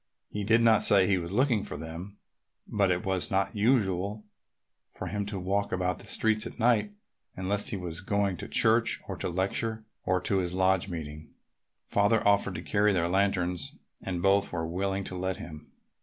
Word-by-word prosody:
He 105 - -3
did 115 +3 +4
not 115 -1 +5
say 100 -2 +5
he 95 -1 +2
was 85 0 -6
looking 120 0 +2
for - - -5
them, 85 +6 -8 0.5
but 100 -2 +1
it 90 -1 0
was 95 -2 -1
not 95 +2 0
usual 105 -2 +1 0.6
for - - -8
him 100 -1 -3
to 100 -2 -4
walk 100 +2 -1
about 90 -1 -1
the - - -12
streets 110 0 0
at - - -10
night 110 -3 +2 0.4
unless 100 +2 -2
he 105 - -3
were 90 -3 -5
going 100 -1 0
to - - -7
church 110 +1 +3
or - - -4
to - - -2
a - - -2
lecture 110 +5 -1 0.2
or 90 0 +1
to 95 +2 0
his 90 -1 -2
lodge 95 0 +2
meeting. 75 -2 -7 0.6
Father 105 +2 +2
offered 100 -2 +3
to 85 - -5
carry 105 +1 +2
their 85 -2 +1
lanterns 90 -2 0 0.3
and 90 -2 -3
both 100 +1 +3
were 80 -2 -2
willing 95 +3 -2
to 95 - -6
let 95 0 -2
him. 75 -2 -10
95 Hz, 190 wpm, -28 LUFS, 90-105 Hz, 0.6 s, not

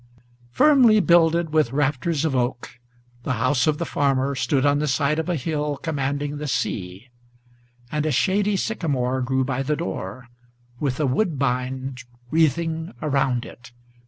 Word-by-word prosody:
Firmly 250 - +5
builded 170 -3 +3
with 155 -6 +2
rafters 145 +2 0
of 145 -4 0
oak, 125 -1 -2 0.4
the 130 - -2
house 125 +3 +1
of 155 -1 +2
the 170 - -3
farmer 140 -2 0
Stood 135 +1 0
on 145 0 +3
the 150 - -1
side 145 +3 +1
of 160 - -3
a 175 - +1
hill 150 0 -2
commanding 145 -1 -3
the 150 0 -5
sea; 95 -2 -3 0.8
and 150 0 -1
a - - +1
shady 200 +8 +1
Sycamore 135 - -1
grew 130 +1 0
by 130 0 -2
the 150 +3 0
door, 95 +2 -5 0.5
with 135 -4 -2
a 150 - +2
woodbine 130 -4 -1 0.3
wreathing 160 -1 0
around 135 -5 0
it. 120 0 -13
140 Hz, 150 wpm, -23 LUFS, 130-160 Hz, 0.8 s, Firmly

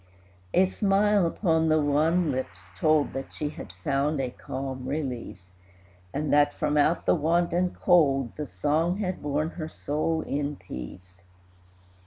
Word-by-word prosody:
A 190 - +6
smile 200 0 +2
upon 160 -2 +1
the 155 0 +4
wan 155 +3 +2
lips 95 -9 -5
told 155 -2 +3
That 135 0 -5
she 150 - -3
had 150 - -9
found 140 +2 0
a 130 -2 -2
calm 130 0 -6
release, 125 - -5 0.6
And 150 +1 -1
that, 145 0 +4
from 150 0 0
out 150 +3 +2
the - - +4
want 170 +2 +1
and 180 +1 0
cold, 140 -8 +3
The 150 -1 -5
song 160 +5 0
had 185 -3 -3
borne 150 +2 -1
her 160 -2 -6
soul 160 +2 -1
in 145 0 -2
peace. 90 - -10
150 Hz, 150 wpm, -27 LUFS, 135-165 Hz, 0.6 s, A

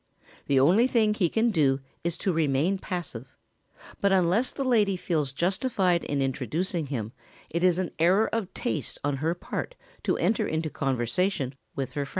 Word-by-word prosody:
The 135 -1 +4
only 185 - +5
thing 220 -4 +3
he 190 -5 +1
can 225 +4 +2
do 140 -7 +2 0.2
is 170 0 -1
to 190 - 0
remain 160 +4 +1
passive, 140 - -6 0.6
but 200 - +2
unless 190 +6 +3
the 275 - -3
lady 215 -7 +2
feels 155 -6 -1
justified 185 - +1
in 140 -1 0
introducing 150 - -2
him 115 -6 -4 0.4
it 170 +2 -1
is 180 -2 +4
an 185 -2 -2
error 185 +7 +4
of 215 -5 -2
taste 155 - -2
on 145 -1 0
her 160 +5 0
part - - -5 0.3
to - - 0
enter 225 - +1
into 160 -1 -2
conversation 135 - 0 0.2
with 135 -2 -3
her 145 -2 -2
friends. - - -13
170 Hz, 170 wpm, -27 LUFS, 140-195 Hz, 0.6 s, only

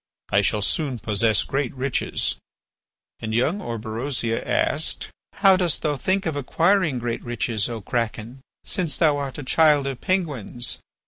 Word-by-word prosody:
I 100 - +5
shall 105 0 +1
soon 140 +1 -1
possess 110 0 +2
great 135 -2 -1
riches." 135 0 -1 0.9
And 110 0 -3
young 155 - +1
Orberosia 115 - -2
asked: - - 0 0.2
"How 195 -1 +5
dost 180 -3 0
thou 150 -2 +1
think 190 +8 0
of 160 -3 -1
acquiring 165 +2 +2
great 120 -1 -3
riches, 120 -2 -1
O 115 -2 -5
Kraken, 115 +2 -3 0.2
since 180 -6 -1
thou 155 -4 +4
art 140 -2 -4
a 145 - -5
child 150 0 +4
of 135 -3 -4
Penguins?" 145 - -2
130 Hz, 145 wpm, -24 LUFS, 115-155 Hz, 0.9 s, I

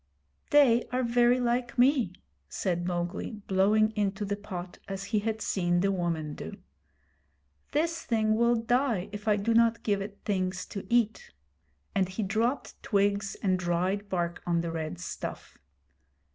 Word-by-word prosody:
'They 255 -5 +5
are 255 +1 0
very 240 +1 +4
like 245 0 0
me,' 250 - +4 0.4
said 175 -2 -1
Mowgli, 175 +4 -2
blowing 210 +3 +3
into 205 -1 -1
the 200 0 -1
pot, 185 -3 -7
as 195 -1 -4
he 215 0 0
had 220 +1 -2
seen 175 -2 +1
the 195 +1 +2
woman 165 -5 -2
do. 80 - -7 1.1
'This 330 +2 0
thing 215 -2 +2
will 235 +1 +3
die 230 -4 +1
if 210 +1 -8
I 210 - +5
do 210 +3 0
not 230 0 +3
give 200 -2 +1
it 200 +1 -6
things 185 -3 -1
to 200 - -6
eat'; 235 -2 +1 0.6
and 190 -2 +1
he 200 +4 -3
dropped 225 +7 -1
twigs 200 0 +1
and 185 -2 +2
dried 185 +3 -1
bark 175 -2 -2
on 170 -1 +2
the 170 -1 -3
red 160 - -4
stuff. - - -6
205 Hz, 155 wpm, -29 LUFS, 185-230 Hz, 1.1 s, They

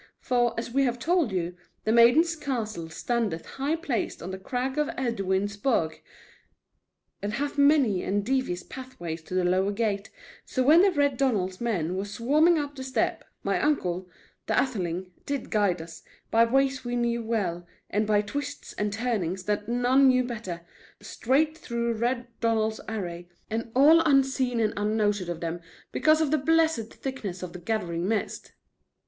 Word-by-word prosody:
For, 240 -1 +1
as 235 - -5
we 275 +3 +2
have 245 -1 0
told 330 - +1
you, 175 -1 -2 0.3
the 220 - +1
Maiden's 245 +9 +5
Castle 220 - -4
standeth 210 -1 -2
high 280 +4 -2
placed 280 - -3
on 180 - -5
the 190 - -6
crag 255 +6 -2
in 300 - +1
Edwin's 200 -5 -1
Burgh, 200 -9 0 1.2
and 205 +1 -3
hath 285 +4 -2
many 280 -10 +4
and 200 +1 -1
devious 255 -8 -1
pathways 175 -12 -7
to 175 +3 -7
the 185 - +2
lower 185 +3 +2
gate, 200 -1 -1 0.3
So 260 - -1
when 310 +6 +7
the 395 - +5
Red 285 -5 +1
Donald's 200 -9 0
men 185 -8 -1
were 195 +2 -2
swarming 285 +11 +3
up 290 -1 -3
the 265 - -6
steep, 260 0 -1 0.2
my - - 0
uncle, 185 -12 0 0.4
the - - +1
Atheling, 185 -8 -2 0.2
did 280 -1 -3
guide 195 -6 +1
us, 165 0 -11 0.3
by 230 +1 +5
ways 270 +2 +1
we 245 0 -3
knew 235 -1 0
well, 190 -7 -2 0.2
and 210 +1 0
by 210 -1 +3
twists 285 +7 -5
and 210 0 -2
turnings 200 -5 -2
that 210 +1 -2
none 250 +3 +4
knew 255 -1 +4
better, 215 -8 -5 0.4
straight 300 +6 0
through 235 -6 -2
Red 240 +2 -1
Donald's 220 -1 0
array, 175 -5 -5 0.2
and 230 +1 -3
all 300 +5 +7
unseen 270 -5 +2
and 220 -1 +1
unnoted 205 -3 0
of 170 -1 -4
them, 170 0 -3 0.3
because 310 0 +3
of 300 -3 +1
the 310 - +3
blessed 320 -6 +2
thickness 210 -10 -5
of 180 - -6
the 180 - -7
gathering 175 -3 -2
mist." 220 0 -2
230 Hz, 165 wpm, -27 LUFS, 190-265 Hz, 1.2 s, when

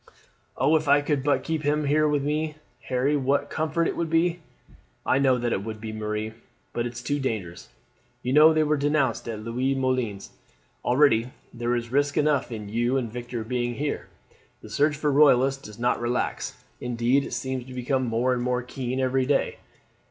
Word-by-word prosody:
"Oh, 145 +4 +3
if 155 -1 -4
I 145 +1 +5
could 145 -2 -1
but 145 0 +2
keep 160 -1 -2
them 150 0 +1
here 155 +2 +3
with 145 -2 +1
me, 150 +1 -1 0.3
Harry, 130 +3 +1
what 140 0 +1
a - - -14
comfort 160 +1 -1
it - - -2
would 170 -1 -2
be!" 165 +2 +2 0.7
"I 130 - +3
know 130 -2 +4
that 120 -1 -1
it 95 - -2
would, 110 0 -7
Marie; 110 0 -3 0.4
but 120 0 -1
it 120 - -7
is 120 0 -8
too 145 +2 -1
dangerous. 105 -10 -4 0.5
You 125 - -1
know 155 +2 +8
they 155 0 +3
were 150 0 +1
denounced 140 -5 +1
at 110 -2 -5
Louise 130 +4 -1
Moulin's. 125 -6 -1 0.5
Already 125 -3 +3 0.2
there 120 0 -1
is 120 -1 -4
risk 145 +1 +1
enough 145 -4 +2
in 105 -3 -6
you 120 +5 0
and 120 -4 -3
Victor 120 -1 -5
being 120 +1 -2
here. 145 +2 -3 0.6
The 110 - -11
search 150 +6 +2
for 150 0 +1
Royalists 135 -1 +4
does 105 -4 -11
not 120 +1 0
relax, 120 +1 -2 0.2
indeed 125 +3 +1
it - - -7
seems 130 -2 -3
to 130 - -9
become 130 +1 0
more 120 +3 +1
and 125 - -1
more 125 0 0
keen 130 0 -4
every 130 0 +1
day. 145 - +1
130 Hz, 195 wpm, -25 LUFS, 120-145 Hz, 0.7 s, know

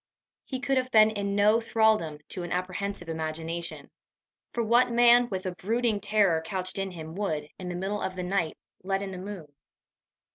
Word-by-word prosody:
He 260 - -4
could 270 +1 +1
have 255 0 0
been 220 -2 +6
in 200 -2 -2
no 210 +3 +4
thraldom 220 -9 +2
to 185 - -4
an 175 - -6
apprehensive 185 +1 -3
imagination; 165 +1 -4 0.6
for 235 - -1
what 235 +3 +4
man, 240 0 +5
with 190 -1 -4
a 185 - -1
brooding 220 +3 0
terror 200 -6 +3
couched 185 +2 -3
in 195 0 -1
him, 160 -3 -8
would, 160 -6 -2
in 180 -1 -5
the 175 - -4
middle 195 +3 -2
of 185 - -3
the 180 - -3
night, 180 -3 -1 0.2
let 195 +1 -1
in 195 - -5
the 185 - -6
moon? 185 -6 -8
195 Hz, 185 wpm, -28 LUFS, 175-220 Hz, 0.6 s, been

